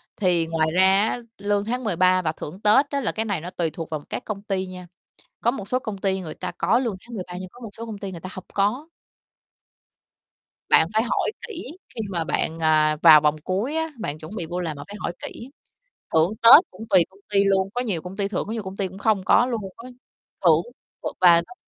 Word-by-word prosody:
thì 175 Hz, -5 st, +1 dB
ngoài 160 Hz, -1 st, +1 dB
ra 190 Hz, +3 st, +4 dB
á, -, -, -3 dB, 0.2 s
lương 205 Hz, 0 st, 0 dB
tháng 250 Hz, +3 st, -2 dB
13 185 Hz, -3 st, +3 dB
và 155 Hz, -3 st, 0 dB
thưởng 165 Hz, +4 st, -9 dB
Tết 260 Hz, +7 st, +4 dB
á, 280 Hz, -1 st, -1 dB
là -, -, -1 dB
cái 220 Hz, -, -2 dB
này 200 Hz, -7 st, -2 dB
nó 175 Hz, -, -6 dB
tùy 170 Hz, -3 st, -2 dB
thuộc 165 Hz, -1 st, -6 dB
vào 155 Hz, -2 st, -4 dB
các -, -, -5 dB
công 205 Hz, -2 st, -5 dB
ty 195 Hz, -2 st, -2 dB
nha. 180 Hz, -1 st, -10 dB, 0.5 s
Có 235 Hz, -, +3 dB
một 205 Hz, -6 st, -7 dB
số 255 Hz, -, +1 dB
công 215 Hz, -5 st, -6 dB
ty 190 Hz, -1 st, -1 dB
người 160 Hz, -3 st, -6 dB
ta -, -, -6 dB
có 195 Hz, +8 st, +2 dB
lương 235 Hz, -6 st, -2 dB
tháng 235 Hz, -1 st, -10 dB
13 180 Hz, -3 st, -6 dB
nhưng 185 Hz, -, -8 dB
có 245 Hz, -, -15 dB
một 225 Hz, -, -7 dB
số 230 Hz, -, -6 dB
công 220 Hz, -2 st, -7 dB
ty 195 Hz, -1 st, -6 dB
người 170 Hz, -3 st, -9 dB
ta 185 Hz, -, -7 dB
hông 185 Hz, -, -9 dB
có. 215 Hz, +10 st, 0 dB, 1.8 s
Bạn 160 Hz, -, +5 dB
phải 220 Hz, +1 st, +3 dB
hỏi 245 Hz, -, 0 dB, 0.2 s
kỹ 345 Hz, -, -8 dB, 0.2 s
khi 225 Hz, -, -3 dB
mà 170 Hz, -4 st, -2 dB
bạn, 160 Hz, 0 st, -2 dB
à, 155 Hz, -1 st, +3 dB
vào 155 Hz, -3 st, +9 dB
vòng 150 Hz, 0 st, +2 dB
cuối 205 Hz, -, -2 dB
á, 320 Hz, 0 st, -1 dB
bạn 150 Hz, -6 st, -4 dB
chuẩn 160 Hz, +7 st, -9 dB
bị 175 Hz, -, -3 dB
vô 175 Hz, +2 st, -4 dB
làm 160 Hz, -4 st, -3 dB
bạn 145 Hz, -, -8 dB
phải 205 Hz, -, -8 dB
hỏi 175 Hz, -, -3 dB
kỹ. 240 Hz, -, -9 dB, 0.6 s
Thưởng 160 Hz, +5 st, +3 dB
Tết 260 Hz, +9 st, +11 dB
cũng 185 Hz, -, -13 dB
tùy 185 Hz, -3 st, +6 dB
công 190 Hz, -, -22 dB
ty 200 Hz, 0 st, +5 dB
luôn, 195 Hz, -1 st, +2 dB
có 245 Hz, -, -1 dB
nhiều 200 Hz, -10 st, -2 dB
công 180 Hz, +4 st, -9 dB
ty 200 Hz, -1 st, 0 dB
thưởng 205 Hz, -, -3 dB
có -, -, -5 dB
nhiều 225 Hz, -2 st, -3 dB
công 190 Hz, 0 st, -8 dB
ty 195 Hz, -, -1 dB
cũng 185 Hz, +1 st, -12 dB
không 205 Hz, -1 st, +1 dB
có 240 Hz, -, +5 dB
luôn 235 Hz, -3 st, -2 dB, 0.2 s
á. 235 Hz, +2 st, -10 dB, 0.6 s
Thưởng -, -, +6 dB, 0.4 s
th -, -, -2 dB
và 175 Hz, -2 st, +8 dB
nó -, -, -12 dB
195 Hz, 245 wpm, -23 LUFS, 175-220 Hz, 1.8 s, Tết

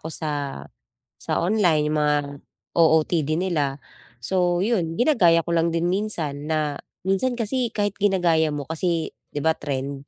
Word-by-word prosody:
ko 160 Hz, -, -6 dB
sa, 145 Hz, -, -4 dB, 0.5 s
sa -, -, -2 dB
online, 175 Hz, -6 st, +2 dB
yung 155 Hz, 0 st, 0 dB
mga 150 Hz, 0 st, +3 dB, 0.6 s
OOTD 160 Hz, -1 st, +3 dB
nila 155 Hz, -7 st, -1 dB, 0.4 s
so, 175 Hz, +7 st, 0 dB
'yun 175 Hz, -8 st, 0 dB
ginagaya 180 Hz, -, +4 dB
ko 170 Hz, -, -2 dB
lang 165 Hz, 0 st, +2 dB
din 165 Hz, +1 st, -1 dB
minsan 165 Hz, -7 st, -2 dB
na 155 Hz, -2 st, 0 dB, 0.3 s
minsan 215 Hz, +6 st, 0 dB
kasi 240 Hz, +2 st, -1 dB
kahit 205 Hz, -2 st, -1 dB
ginagaya 175 Hz, -6 st, +3 dB
mo 145 Hz, -1 st, -3 dB
kasi 165 Hz, +2 st, -1 dB, 0.2 s
'di 145 Hz, -, -5 dB
ba 160 Hz, -, +5 dB
trend 140 Hz, -1 st, -5 dB
165 Hz, 150 wpm, -23 LUFS, 150-190 Hz, 0.6 s, ba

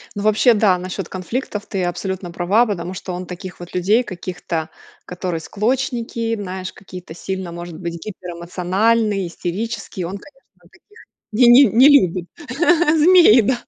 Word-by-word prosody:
Ну 205 Hz, -, -4 dB
вообще, 215 Hz, +3 st, +4 dB
да, 205 Hz, -4 st, +3 dB
насчет 185 Hz, 0 st, -5 dB
конфликтов 205 Hz, +3 st, -4 dB
ты 190 Hz, -2 st, -2 dB
абсолютно 175 Hz, +1 st, -4 dB
права, 190 Hz, +7 st, +2 dB
потому 185 Hz, -4 st, -4 dB
что 185 Hz, 0 st, -6 dB
он 180 Hz, +1 st, -5 dB
таких 180 Hz, +1 st, -9 dB
вот 175 Hz, 0 st, -10 dB
людей 205 Hz, +7 st, +2 dB
каких-то, 175 Hz, -5 st, -5 dB, 0.4 s
которые 180 Hz, -2 st, -4 dB
склочники, 230 Hz, +3 st, -2 dB
знаешь, 185 Hz, -3 st, -6 dB
какие-то 180 Hz, -3 st, -11 dB
сильно, 190 Hz, +1 st, -5 dB
может 170 Hz, -1 st, -8 dB
быть, 170 Hz, -2 st, -5 dB
гиперэмоциональные, 190 Hz, +3 st, -1 dB
истерические, 185 Hz, +1 st, -5 dB
он, 190 Hz, +3 st, -6 dB
конечно, 270 Hz, +6 st, -19 dB, 0.2 s
таких 425 Hz, +1 st, -22 dB, 0.3 s
не 235 Hz, +4 st, +4 dB
не 245 Hz, +4 st, +8 dB
не 245 Hz, +7 st, +6 dB
любит 185 Hz, -, +3 dB, 0.7 s
змей, 320 Hz, -7 st, +7 dB
да. 240 Hz, +2 st, -1 dB
190 Hz, 145 wpm, -19 LUFS, 180-230 Hz, 0.7 s, не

